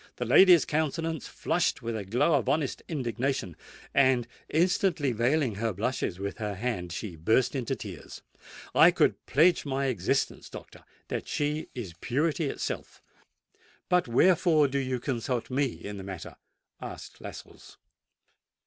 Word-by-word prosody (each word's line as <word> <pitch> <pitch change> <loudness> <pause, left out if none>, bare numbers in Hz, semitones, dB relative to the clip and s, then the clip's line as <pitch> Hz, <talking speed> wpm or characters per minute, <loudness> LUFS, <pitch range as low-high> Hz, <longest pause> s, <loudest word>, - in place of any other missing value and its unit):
The - - -3
lady's 180 -4 +7
countenance 160 0 -2
flushed - - -1
with 115 0 -3
a 105 - -3
glow 120 - +2
of 140 -5 +1
honest 150 -3 0
indignation; 125 - -2 0.4
and, 130 -3 +3 0.2
instantly 170 -3 +2
veiling 125 +2 +1
her 115 -2 0
blushes 105 -2 -2
with 100 +4 -5
her 105 -2 -3
hand, 95 -5 -3
she 85 +2 -5
burst 110 +10 +2
into 135 0 -2
tears. 95 - -9 0.5
I - - +8
could - - +1
pledge 165 +5 +4
my 140 -1 -1
existence, 130 -3 -1
doctor, - - -11 0.3
that - - -3
she 150 +1 -1
is 105 -9 -6
purity 155 +5 0
itself." - - -5 0.9
"But 180 -4 +3
wherefore 160 +3 +4
do 140 +1 -1
you 130 -2 -2
consult 125 -1 -3
me 140 +2 +2
in 105 -4 -8
the 95 - -7
matter?" 95 -3 -8 0.5
asked - - -9
Lascelles. - - -11
130 Hz, 140 wpm, -28 LUFS, 110-150 Hz, 0.9 s, I